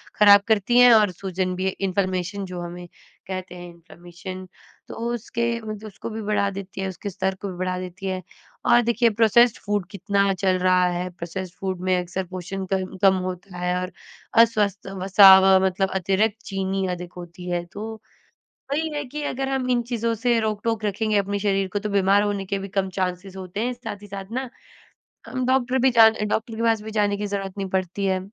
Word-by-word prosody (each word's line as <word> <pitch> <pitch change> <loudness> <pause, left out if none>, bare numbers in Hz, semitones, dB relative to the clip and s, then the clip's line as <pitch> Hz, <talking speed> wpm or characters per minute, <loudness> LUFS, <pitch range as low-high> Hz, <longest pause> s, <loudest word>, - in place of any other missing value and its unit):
खराब 205 -1 +7
करती 220 +2 +2
हैं 245 0 +8
और 210 -3 +5
सूजन 185 0 -3
भी 185 +1 -1
इन्फ्लेमेशन 190 0 -2
जो 180 -1 -6
हमें 175 +1 -7 0.4
कहते 185 -1 -6
हैं 175 0 -9
इन्फ्लेमेशन, 175 +2 -10 0.4
तो - - -7 0.2
उसके 235 0 -2
मतलब 215 0 -7
उसको 205 - -8
भी 220 +1 -5
बढ़ा 205 -1 +1
देती 195 0 -7
है, 190 - -2
उसके 190 +2 -6
स्तर 190 0 -2
को 200 +1 -6
भी 180 - -9
बढ़ा 185 0 -2
देती 185 +1 -8
है 185 -1 -2 0.5
और 240 0 +6
देखिए 235 0 +3
प्रोसेस्ड 230 +2 +4
फूड 205 -2 0
कितना 200 0 +1
चल 190 0 +1
रहा 185 0 +3
है। 175 +1 -3
प्रोसेस्ड 180 +1 -7
फूड 190 -2 -3
में 185 - +3
अक्सर 180 +1 -4
पोषण 185 +2 -5
क 190 0 -2
कम 195 -1 +6
होता 180 0 -7
है 180 0 -1
और 185 +1 -5 0.5
अस्वस्थ 210 -4 -1 0.2
वसा 195 0 +9
व 190 0 +5
मतलब 190 +1 0
अतिरिक्त 195 +4 +1
चीनी 195 -1 -2
अधिक 180 0 -6
होती 175 +1 -9
है 175 -1 -1
तो, 215 +4 -8 0.7
वही 315 +3 0
है 295 0 -2
कि 295 +4 -6
अगर 270 -1 -2
हम 265 -2 -1
इन 245 -1 +2
चीज़ों 230 -1 0
से 235 +1 +1
रोक-टोक 220 +1 -1
रखेंगे 210 +1 0
अपने 200 0 0
शरीर 195 -1 +1
को 205 - 0
तो 210 +1 -4
बीमार 200 0 +3
होने 205 -1 -2
के 200 +1 -2
भी 195 - -6
कम 195 0 -1
चांसेस 185 +1 -3
होते 185 +1 -6
हैं। 250 - -1
साथ 240 -4 -8
ही 205 - -11
साथ 195 0 -8
ना, 260 +1 -3 0.8
हम 255 -1 -2
डॉक्टर 260 0 +2
भी 265 +1 +4
जान 225 -2 +7
अ, - - -3
डॉक्टर 220 +2 -2
के 225 - -4
पास 225 -2 +2
भी 220 +1 -7
जाने 205 -1 +1
की 205 0 -3
ज़रूरत 195 -1 -4
नहीं 195 -1 -3
पडती 190 +1 -2
है। 190 -1 +1
195 Hz, 205 wpm, -23 LUFS, 185-215 Hz, 0.8 s, वसा